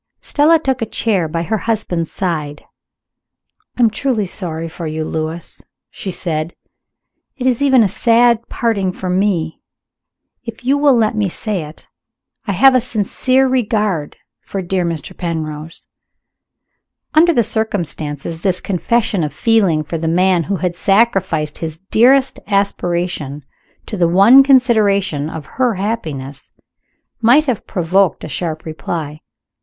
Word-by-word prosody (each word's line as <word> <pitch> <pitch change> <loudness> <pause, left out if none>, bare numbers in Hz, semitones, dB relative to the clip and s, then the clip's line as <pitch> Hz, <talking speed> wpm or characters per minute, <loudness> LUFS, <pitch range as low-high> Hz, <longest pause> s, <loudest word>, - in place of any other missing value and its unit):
Stella 305 +3 +4
took 265 -5 -2
a 225 - -1
chair 200 -6 0
by 165 +2 -3
her 220 +5 -1
husband's 175 -7 -1
side. 155 -5 -3 1.1
"I 245 - +3
am 225 - +4
truly 225 -2 -1
sorry 165 -3 -4
for 165 0 -7
you, 155 0 -3
Lewis," 160 +2 -5 0.3
she 195 - -6
said. 165 -3 -3 0.8
"It 255 - -4
is 255 0 +1
even 265 -4 +5
a - - +3
sad 235 +2 +2
parting 200 -6 -1
for 185 0 -4
Me. 180 -4 0 0.8
If 230 +1 -9
you 270 +2 +3
will 285 -2 +4
let 220 -2 +1
me 210 -3 0
say 200 -1 -3
it, 150 +1 -13 0.6
I 200 - 0
have 265 +8 +6
a 255 - +3
sincere 255 +3 +1
regard 210 - -1 0.3
for 195 -1 -5
dear 180 +1 -1
Mr. 165 -3 -4
Penrose." 160 -2 -5 1.3
Under 335 +2 +5
other 235 - +3
circumstances, 165 -8 -3
this 185 -1 0
confession 200 0 0
of 150 - -2
feeling 195 -9 +2
for 165 +2 -5
the 160 - -2
man 180 +1 +3
who 200 - -1
had 180 -2 -2
sacrificed 190 -7 +1
his 160 -1 -5
dearest 260 +3 +4
aspiration 175 -7 -2 0.4
to 215 - -6
the 175 -2 +3
one 200 +10 +7
consideration 210 - +2
of 160 -2 -7
her 250 -3 -1
happiness, 155 -10 -5 0.7
might 250 +7 +5
have 255 -7 -2
provoked 185 0 +1
a - - -5
sharp 155 +1 -4
reply. 155 -1 -5
190 Hz, 140 wpm, -17 LUFS, 165-230 Hz, 1.3 s, one